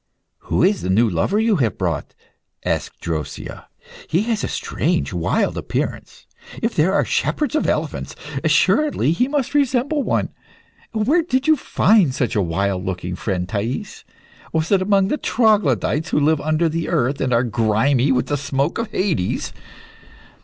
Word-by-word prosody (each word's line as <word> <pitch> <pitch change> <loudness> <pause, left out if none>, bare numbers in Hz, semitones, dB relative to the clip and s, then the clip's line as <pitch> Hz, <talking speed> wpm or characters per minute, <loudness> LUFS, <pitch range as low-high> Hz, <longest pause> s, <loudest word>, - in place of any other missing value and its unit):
"Who - - +1
is 195 +2 +2
the - - -3
new 110 +5 +4
lover 110 - 0
you 220 -2 +2
have 120 -7 0
brought?" 85 -6 -3 0.5
asked - - -2
Drosea. 80 -3 -5 0.4
"He 175 +6 +2
has 225 -2 -1
a - - 0
strange, 70 +3 -1
wild 85 -2 0
appearance. - - -4 0.3
If 230 - -1
there 165 +4 +2
are 200 - +2
shepherds 300 -1 -1
of 310 - +1
elephants, - - -2 0.3
assuredly 300 - +2
he 250 +10 +1
must 280 -2 -1
resemble 280 +1 +1
one. - - 0 0.6
Where 230 +10 +2
did 265 -5 -1
you 315 - +5
find 205 - +3
such 120 - -1
a 105 - +2
wild 95 +2 -1
looking 90 -1 -4
friend, 90 -2 -2
Thais? 110 +6 -4 0.5
Was 160 +3 -1
it 195 -2 +4
amongst 195 0 +2
the 295 - +1
troglodytes 165 - +1
who - - +2
live 150 +1 +2
under 155 +2 +1
the 165 +1 -2
earth, 135 +4 0
and 130 - 0
are 120 0 +3
grimy 120 +4 +2
with 125 -1 +1
the 145 - -1
smoke 140 +4 -1
of 230 - -3
Hades?" 175 - -1
155 Hz, 160 wpm, -20 LUFS, -, 0.6 s, you